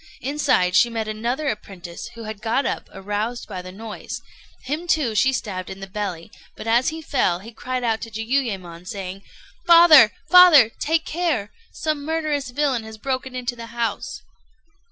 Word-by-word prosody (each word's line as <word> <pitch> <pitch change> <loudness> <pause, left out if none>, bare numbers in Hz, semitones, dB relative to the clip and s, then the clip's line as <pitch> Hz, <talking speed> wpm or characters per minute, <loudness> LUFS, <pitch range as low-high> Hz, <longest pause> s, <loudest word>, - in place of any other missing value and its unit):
Inside 260 -10 +1
she 240 - +5
met 225 -2 -3
another 235 +7 -2
apprentice, 185 -7 -6
who 230 - -8
had 215 -1 -7
got 230 +5 0
up, - - -3
aroused 210 +5 -4
by 190 -4 -6
the 185 0 -9
noise; 215 +3 -7 0.4
him 305 +6 -4
too 295 -9 +1
she 260 +5 +3
stabbed 190 -8 -4
in 190 - -8
the 195 - -6
belly, 190 -4 -5 0.2
but - - -9
as 235 +3 +3
he 320 +1 -7
fell 185 - +1
he 210 +6 -11
cried 255 +2 -4
out 225 -2 0
to 230 - -6
Jiuyémon, 215 -7 -3
saying: 195 -1 -6 0.5
"Father, 335 -9 +9 0.2
father! 335 -9 +8
take 320 +1 0
care! 310 - -1 0.2
Some 305 -2 -2
murderous 305 -3 -1
villain 260 -2 0
has 220 0 -10
broken 260 +2 -3
into 250 -1 -3
the 230 -1 -8
house." 230 -2 -4
230 Hz, 170 wpm, -22 LUFS, 205-280 Hz, 0.5 s, Father